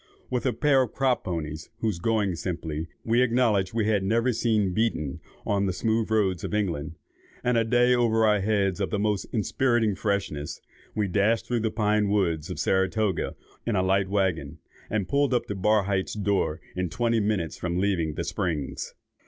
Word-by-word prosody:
With 125 +1 0
a - - +3
pair 145 -3 +3
of 125 - -2
crop 130 -2 +1
ponies, 80 -3 -4
whose 110 -6 -1
going, 105 -1 +1
simply, 80 -2 -4 0.2
we 115 +2 +3
acknowledged 115 -5 +2
we 110 -2 +1
had 105 -3 +2
never 115 +5 +2
seen 110 -5 +1
beaten 90 -10 -1 0.3
on 100 -1 +1
the 95 - 0
smooth 110 +4 0
roads 100 -6 +1
of - - -2
England, 85 -7 -2 0.5
and 125 0 +2
a 115 - +4
day 120 +2 +3
over 115 -2 +3
our 105 -1 +4
heads 100 -1 +1
of 95 - 0
the 105 - -1
most 105 -1 0
inspiriting 115 0 +1
freshness, 95 -8 -2 0.4
we 105 -2 +1
dashed 105 +4 +2
through 120 -1 0
the 110 0 0
pine 105 -2 +1
woods 85 -7 0
of - - -5
Saratoga 95 0 0 0.3
in 115 - -1
a 95 - +2
light 95 0 +2
waggon, 90 -7 0 0.3
and 105 -3 -1
pulled 140 -2 +2
up 120 - +1
at 95 -2 -4
Barhydt's 100 -2 +1
door 100 -6 0 0.2
in 90 -1 -1
twenty 115 +4 +1
minutes 100 -6 -1
from 90 0 -2
leaving 90 -6 0
the - - -2
Springs. 80 -8 -3
105 Hz, 180 wpm, -26 LUFS, 95-115 Hz, 0.5 s, a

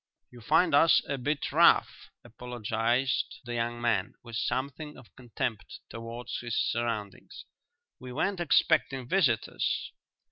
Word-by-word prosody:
"You 120 -1 -13
find 175 +10 +3
us 160 +3 +5
a 140 - -3
bit 145 +3 -2
rough," - - +4
apologized 120 +2 -2
the 120 - -5
young 120 0 -2
man, 110 -5 0
with 115 -1 -9
something 135 +6 -3
of 115 - -17
contempt 120 -3 -5
towards 115 +1 -6
his 120 -2 -3
surroundings. 115 -4 -3 0.5
"We 125 0 -9
weren't 180 +8 -1
expecting 145 -6 +2
visitors." 135 - 0
120 Hz, 120 wpm, -29 LUFS, 115-135 Hz, 0.5 s, us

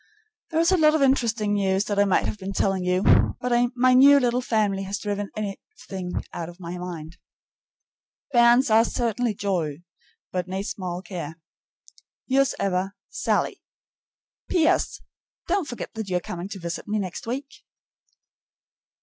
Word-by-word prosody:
There 320 - 0
is 335 +2 +4
a 375 - +4
lot 305 -1 +5
of 300 - +2
interesting 235 -6 +2
news 195 0 +1
that 205 -1 -1
I 205 - +5
might 195 - +2
have 210 - -4
been 195 +1 -5
telling 195 -1 0
you, 180 +1 +1 0.4
but 250 0 -2 0.2
my 255 +1 +4
new 280 +2 +8
little 245 -1 +1
family 210 -5 0
has 195 +1 -3
driven 205 -1 -3
everything 195 - -5
out 165 -1 -5
of 175 +1 -13
my 175 0 -6
mind. 170 -1 -7 1.1
Bairns 240 0 +5
are 220 +1 +6
certain 235 0 -1
joy, 175 -6 -2 0.5
but 180 -1 -2
nae 190 +1 -3
sma' 180 -3 -4
care. 170 -5 -6 0.9
Yours 270 +1 +2
ever, 195 +1 -1
SALLIE. 375 - -1 0.9
P.S. 330 -3 +2 0.4
Don't 370 -2 0
forget 240 - -6
that 220 -3 -5
you 180 - +1
are - - 0
coming 175 +2 -6
to 200 - -6
visit 170 0 -5
me 210 +1 -1
next 190 +1 -4
week. 275 +4 -5
205 Hz, 155 wpm, -25 LUFS, 185-245 Hz, 1.1 s, new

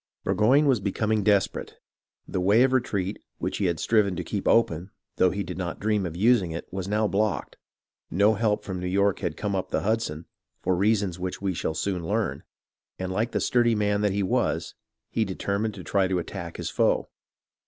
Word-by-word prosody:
Burgoyne 130 +8 +4
was 130 -5 +3
becoming 105 +2 0
desperate. 100 -1 +1 0.5
The 90 - -2
way 105 +6 +5
of 130 0 +2
retreat, 100 -6 -1 0.2
which - - -3
he 100 - +1
had 85 -3 0
striven 105 -4 +2
to - - -3
keep - - -3
open, 90 -5 +2 0.3
though 95 - +5
he 100 +3 -2
did - - -6
not 85 -2 -4
dream 105 -2 +1
of 80 - -7
using 110 -3 +4
it, 80 +1 -6
was 95 -1 -3
now 105 +1 +1
blocked, 105 0 -1 0.5
no 100 +5 +4
help 105 -1 0
from 95 -2 -4
New 90 - -3
York 100 +1 +2
had 80 - -3
come 105 -2 -2
up 95 - -2
the - - 0
Hudson 105 -8 -1 0.4
(for 95 0 +2
reasons 100 -2 +1
which 90 0 -4
we 100 -1 -1
shall 80 -1 -2
soon 90 -2 -2
learn), - - -1 0.6
and 95 0 -4
like 110 +5 0
the - - 0
sturdy 120 -2 +3
man 105 -1 +1
that 105 -1 +2
he 100 +1 0
was, 95 - 0 0.4
he 115 - +1
deter 100 0 -2
mined 110 0 -2
to - - -8
try 95 -2 +1
to 95 -1 0
attack 85 0 -5
his - - -4
foe. - - +2
100 Hz, 205 wpm, -26 LUFS, 90-110 Hz, 0.6 s, way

